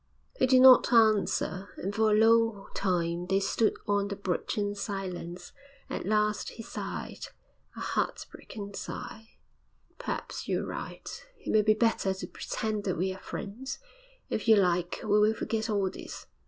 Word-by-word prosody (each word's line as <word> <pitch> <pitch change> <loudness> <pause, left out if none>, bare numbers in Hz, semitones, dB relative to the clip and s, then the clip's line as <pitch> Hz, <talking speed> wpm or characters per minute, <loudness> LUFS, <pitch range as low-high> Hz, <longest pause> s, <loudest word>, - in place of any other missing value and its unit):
He - - +4
did 255 0 +6
not 260 -1 +8
answer, 215 -4 +3
and 195 +2 -3
for 220 +1 +3
a 210 - +4
long 225 -2 +3
time 175 -2 -1
they 195 +1 +2
stood 215 +3 +1
on 205 -1 +1
the 200 - -4
bridge 190 0 -2
in 205 -1 0
silence. 190 -4 -5 0.4
At - - -4
last 210 0 +1
he 225 - -8
sighed - - -6 0.5
a - - -7
heartbroken 200 -4 -4
sigh. 220 +2 -8 0.6
'Perhaps - - -4
you're - - 0
right. - - -7 0.3
It - - -5
may 215 - +5
be 215 0 +4
better 215 -4 +1
to 190 - -6
pretend 215 -2 -3
that 185 -4 -1
we 185 +2 0
are 190 - -11
friends. 245 +9 -6 0.5
If 220 - -3
you 220 - +8
like, 180 -3 +1
we 210 0 +3
will 215 +1 +4
forget 225 0 -2
all 200 -3 +1
this.' - - -8
205 Hz, 160 wpm, -29 LUFS, 190-220 Hz, 0.6 s, not